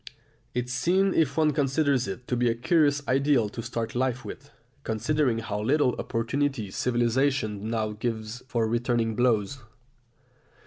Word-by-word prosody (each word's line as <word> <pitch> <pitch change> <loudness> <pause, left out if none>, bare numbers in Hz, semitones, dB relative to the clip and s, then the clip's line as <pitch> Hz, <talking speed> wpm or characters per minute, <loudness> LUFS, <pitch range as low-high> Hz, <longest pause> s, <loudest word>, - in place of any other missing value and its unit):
It 125 0 -1
seems, 185 +10 +1
if 160 -1 +1
one 155 -2 +3
considers 140 -3 +1
it, 120 +6 -6
to 125 - 0
be 120 0 +2
a 115 - 0
curious 145 +2 +2
ideal 135 -4 +2
to 115 - -6
start 115 -1 -4
life 130 +1 -1
with, 140 +3 -9 0.3
considering 125 +3 0
how 105 -2 -3
little 130 +2 +2
opportunity 120 -2 -1
civilisation 120 -2 0
now 110 -2 -1
gives 110 +1 -4
for 115 -3 0
returning 115 -1 0
blows! 120 +1 +1
125 Hz, 140 wpm, -27 LUFS, 115-140 Hz, 0.3 s, one